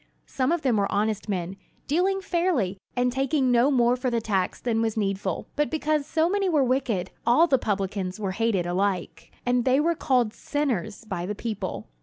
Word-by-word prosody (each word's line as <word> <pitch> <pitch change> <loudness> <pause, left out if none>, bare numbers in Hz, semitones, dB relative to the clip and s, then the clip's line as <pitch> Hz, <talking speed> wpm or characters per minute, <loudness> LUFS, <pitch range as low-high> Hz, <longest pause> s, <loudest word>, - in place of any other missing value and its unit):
Some 260 +1 -1
of 340 -3 0
them 250 -5 +2
were 200 -1 0
honest 210 +1 -1
men, 185 -1 -3 0.3
dealing 375 +6 +1
fairly, 335 - 0 0.2
and 250 0 +2
taking 270 0 +1
no 245 +3 +4
more 245 -3 +3
for 255 0 -1
the 235 -1 0
tax 195 -4 -1
than 225 -2 0
was 225 -1 -1
needful; 195 -3 -1
but 295 0 +1
because 305 -2 0
so 320 0 +2
many 395 +1 +1
were 300 -5 +3
wicked, 245 -8 0
all 245 +8 +5
the 275 -6 +2
publicans 195 -3 -2
were 195 -3 -2
hated 205 -3 0
alike; 185 0 -2
and 245 0 +2
they 260 +2 +3
were 335 +3 +2
called 250 -8 +1
"sinners" 235 - -2
by 180 -4 -4
the 210 - -3
people. 195 - -4
235 Hz, 190 wpm, -26 LUFS, 200-280 Hz, 0.3 s, all